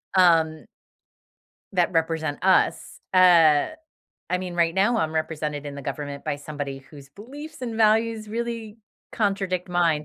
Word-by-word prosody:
um 165 -4 +3 1.1
that 180 -2 +2
represent 160 -2 -1
us. 190 -1 +2
Uh, 170 -5 +6 0.6
I 180 - 0
mean, 180 -1 -6
right 170 -1 +1
now 210 +5 +2
I'm 160 -5 -1
represented 155 -2 -3
in 145 - -6
the 140 - -7
government 140 0 -6
by - - -2
somebody 145 -2 -6
whose 140 -3 -13
beliefs 270 - -11
and 235 -2 -4
values 220 0 +2
really 230 -1 -4 0.4
contradict 195 -4 -1
mine. 170 -4 +1
175 Hz, 135 wpm, -24 LUFS, 155-210 Hz, 1.1 s, Uh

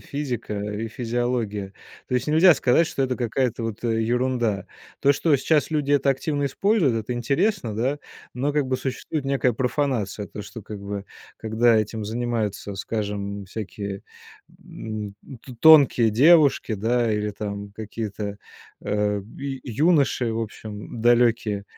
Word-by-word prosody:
физика 125 -7 -4
и 105 +2 -4
физиология. 115 -4 -2 0.4
То 125 - -2
есть 125 - 0
нельзя 160 +3 +6
сказать, 145 +5 +3
что 135 - -2
это 130 -1 -1
какая-то 120 -1 -1
вот, 115 0 -5
э, 115 -1 +1
ерунда. 120 -3 0 0.3
То, 140 - +4
что 145 +1 +2
сейчас 150 +4 +1
люди 145 -2 0
это 140 -1 +3
активно 145 +1 -1
используют,- 185 - +2
это 125 - -3
интересно, 135 - 0
да, 130 +6 0 0.4
но 135 +4 -1
как 145 -2 +1
бы 130 0 0
существует 135 +3 -4
некая 135 -2 +1
профанация. 120 -5 -1
То, 105 - -8
что, 115 - -9
как 105 0 -8
бы, 100 0 -5 0.3
когда 115 +1 +2
этим 110 0 -1
занимаются, 110 -3 -2
скажем, 100 -1 -4
всякие, 100 0 -6 0.6
м, 105 -2 -7 0.3
то 130 - -10
тонкие 140 -7 +7
девушки, 145 +1 +5
да, 115 +2 +1
или 105 0 -1
там 100 0 -6
какие-то, 105 -1 -5 0.4
э, 105 0 0 0.2
ю 135 -1 -5 0.3
юноши, 130 -7 +2
в 115 - -2
общем, 105 0 -7
далёкие. 115 -3 +3
115 Hz, 145 wpm, -24 LUFS, 105-135 Hz, 0.6 s, тонкие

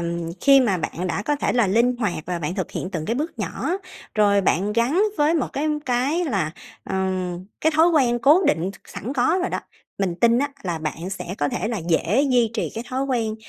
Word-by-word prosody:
ừm, 170 -1 -3
khi 275 -1 +6
mà 215 -7 +2
bạn 175 +2 -3
đã 190 +3 -2
có 295 +5 0
thể - - 0
là 240 -4 +3
linh 235 +5 +2
hoạt 210 -7 -1
và 180 0 -2
bạn 165 +1 -3
thực 185 -3 -3
hiện 180 - -4
từng 165 -5 -3
cái 230 - 0
bước 305 +6 -3
nhỏ, - - -3 0.4
rồi 205 -2 +4
bạn 195 +2 +1
gắn 245 - +2 0.2
với 300 +3 +3
một 295 - 0
cái 300 +3 -1 0.2
cái 270 +8 +1
là, 195 - -1 0.3
ờm, 185 -1 -2 0.2
cái 315 0 +2
thói 320 +2 +5
quen 255 -8 +3
cố 300 +9 +5
định 180 - +1
s - - -14 0.2
sẵn 245 +7 -4
có 285 +7 +2
rồi 365 - -1
đó, - - -2 0.4
mình 190 -3 0
tin 235 0 +5
á, 285 +2 +1
là 175 -3 -2
bạn 160 +4 -4
sẽ 185 -1 -5
có 145 - +1
thể 220 - -2
là 230 - -2
dễ 185 - +2
duy 240 -3 +3
trì 220 - -2
cái 225 +2 -5
thói 260 +1 -1
quen 230 -5 -1
225 Hz, 230 wpm, -23 LUFS, 185-270 Hz, 0.4 s, khi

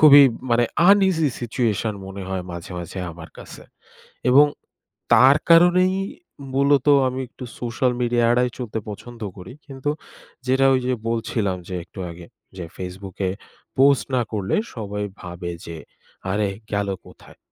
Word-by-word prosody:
খুবই 145 -2 +10 0.3
মানে 120 0 +4 0.3
uneasy 190 -6 +4
situation 115 -3 -1
মনে 95 0 -7
হয় 95 -1 -3
মাঝে, 85 +2 -8
মাঝে 85 +2 -7
আমার 80 -1 -11
কাছে। - - -11 0.7
এবং 145 +3 +7 0.7
তার 130 +5 +7
কারণেই 180 +2 +6 0.6
মূলত 140 0 +3 0.2
আমি 130 +1 -4
একটু 130 - -10 0.2
social 125 +1 0
media 120 0 +1
এড়ায় 125 0 +2
চলতে 115 -3 -4
পছন্দ 120 +3 -10 0.2
করি। 90 +6 -10
কিন্তু 135 0 -3 0.6
যেটা 130 +1 +3
ওই 130 - +2
যে 130 - +1 0.2
বলছিলাম 110 -4 -1
যে 90 - -5
একটু - - -16
আগে। 85 0 -12 0.3
যে 90 - -5
Facebook-এ 95 +1 -4 0.5
post 140 0 +5
না 125 - +3
করলে 100 -3 -1 0.2
সবাই 105 -2 -4 0.2
ভাবে 90 0 -6 0.2
যে 85 -1 -7 0.6
"আরে 105 0 +1 0.2
গেল 100 -1 0 0.2
কোথায়? - - -16
120 Hz, 140 wpm, -22 LUFS, 95-135 Hz, 0.7 s, খুবই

